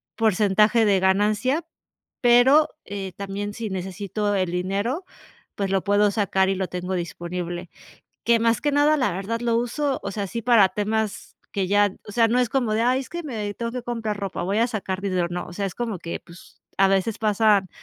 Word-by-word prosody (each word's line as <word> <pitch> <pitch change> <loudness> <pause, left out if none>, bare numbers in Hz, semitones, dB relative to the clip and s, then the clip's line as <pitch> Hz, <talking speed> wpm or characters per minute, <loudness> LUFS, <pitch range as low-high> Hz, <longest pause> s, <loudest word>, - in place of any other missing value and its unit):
porcentaje 215 +1 +3
de 200 -2 +3
ganancia, 210 - +2 0.6
pero, 245 +5 +6 0.2
eh, 195 -1 -5
también 200 +1 -4
si 225 -2 -5
necesito 200 +2 -3
el 185 -3 0
dinero, 200 - -1 0.5
pues 200 -1 -2
lo 195 -1 +1
puedo 205 0 +3
sacar 195 -2 +1
y 195 - +1
lo 190 -1 -2
tengo 180 +1 -4
disponible. 175 0 -5 0.6
Que 235 0 +4
más 230 -1 +2
que 295 - +2
nada, 290 +2 +4
la 250 -8 +1
verdad, 205 +6 -3
lo 235 -1 +1
uso, 265 +4 -1
o 200 - -4
sea, 200 -1 -3
sí 230 +2 -4
para 230 -6 +5
temas 215 0 -2 0.2
que 190 -2 -1
ya, 205 -1 +3
o - - -7
sea, 230 0 +4
no 240 +2 +2
es 245 - +1
como 240 -5 0
de: 225 - +1
"Ay 250 +2 +3
es 270 - -8
que 345 0 -5
me 215 -7 -4
tengo 230 +1 -3
que 250 0 -4
comprar 230 -3 -3
ropa, 195 -3 -4
voy 195 +4 0
a 235 - +4
sacar 195 -5 -4
dinero, 185 -3 0
no, 175 0 -4
o 175 - -10
sea, 200 +1 -2
es 190 - -6
como 230 -6 -3
que, 170 0 -5
pues, 170 +2 -16 0.2
a 195 0 +5
veces 195 +3 +1
pasan, 210 -3 +3
205 Hz, 205 wpm, -24 LUFS, 190-230 Hz, 0.6 s, pero